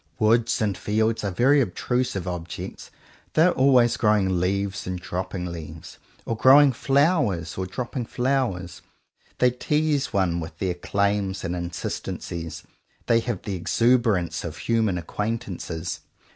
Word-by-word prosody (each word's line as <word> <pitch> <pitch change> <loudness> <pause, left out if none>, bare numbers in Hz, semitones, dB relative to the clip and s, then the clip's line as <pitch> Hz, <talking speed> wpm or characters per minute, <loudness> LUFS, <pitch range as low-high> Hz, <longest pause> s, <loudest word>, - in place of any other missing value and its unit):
Woods 115 +2 +2
and 100 -3 0
fields 110 +4 0
are 100 - 0
very 135 +9 +4
obtrusive 115 -2 -1
objects. 85 -1 -6 0.5
They 160 - +6
are 180 - +5
always 130 -4 +4
growing 100 -4 +2
leaves 95 +1 -1
and 90 -1 -3
dropping 90 0 -4
leaves, 80 -1 -9 0.3
or 115 - -2
growing 135 +5 +7
flowers 135 - +1
or 95 0 -3
dropping 120 +4 -4
flowers. 120 - -1 0.6
They 125 0 +4
tease 150 +2 0
one 90 -3 +1
with 80 -1 -7
their 95 -1 -1
claims 100 +2 -1
and 85 - -2
insistencies. 85 -1 -5 0.4
They 115 -1 +4
have 115 -4 -4
the 100 - -4
exuberance 110 0 +1
of - - -6
human 110 -5 +1
acquaintances. 95 -3 -4
105 Hz, 130 wpm, -24 LUFS, 90-125 Hz, 0.6 s, growing